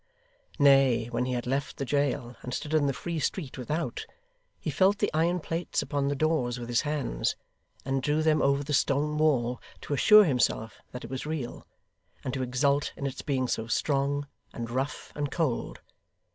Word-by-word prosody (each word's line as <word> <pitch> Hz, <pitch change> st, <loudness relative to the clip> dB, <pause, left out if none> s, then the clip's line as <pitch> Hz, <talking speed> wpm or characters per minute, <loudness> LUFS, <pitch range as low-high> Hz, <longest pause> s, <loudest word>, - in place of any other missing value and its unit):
Nay, 135 Hz, -5 st, +5 dB
when 125 Hz, +1 st, 0 dB
he 130 Hz, -, -2 dB
had 120 Hz, -1 st, -2 dB
left 135 Hz, +3 st, -2 dB
the 135 Hz, -, -2 dB
jail, 125 Hz, -3 st, 0 dB
and 125 Hz, 0 st, -4 dB
stood 150 Hz, -, -4 dB
in 150 Hz, -2 st, +3 dB
the -, -, +2 dB
free 160 Hz, +6 st, -4 dB
street, 150 Hz, -1 st, -2 dB
without, 155 Hz, -, -3 dB, 0.6 s
he -, -, -3 dB
felt 195 Hz, +2 st, +3 dB
the 205 Hz, -, 0 dB
iron 170 Hz, +3 st, +2 dB
plates 165 Hz, +1 st, -2 dB
upon 140 Hz, -2 st, -1 dB
the 145 Hz, -, 0 dB
doors, 135 Hz, -5 st, 0 dB
with 120 Hz, 0 st, -6 dB
his 120 Hz, -, +2 dB
hands, 145 Hz, -, -1 dB, 0.5 s
and 135 Hz, 0 st, 0 dB
drew 150 Hz, +3 st, +1 dB
them 155 Hz, -1 st, +3 dB
over 140 Hz, +1 st, +2 dB
the 145 Hz, +1 st, -3 dB
stone 145 Hz, +2 st, +2 dB
wall, 125 Hz, -6 st, +2 dB, 0.2 s
to -, -, -4 dB
assure 210 Hz, +9 st, +8 dB
himself 115 Hz, -, 0 dB
that 125 Hz, -, -7 dB
it 115 Hz, -, -8 dB
was 130 Hz, +2 st, -4 dB
real; 150 Hz, -6 st, -5 dB, 0.6 s
and 130 Hz, -, -3 dB
to 130 Hz, -, -2 dB
exult 140 Hz, +3 st, +1 dB
in 140 Hz, -, -5 dB
its 140 Hz, 0 st, -4 dB
being 130 Hz, -3 st, 0 dB
so 110 Hz, -2 st, -2 dB
strong, 140 Hz, +3 st, 0 dB, 0.3 s
and 115 Hz, -1 st, -5 dB
rough, 135 Hz, +3 st, -3 dB
and 145 Hz, -1 st, -2 dB
cold. 150 Hz, -6 st, -2 dB
140 Hz, 185 wpm, -28 LUFS, 125-150 Hz, 0.6 s, assure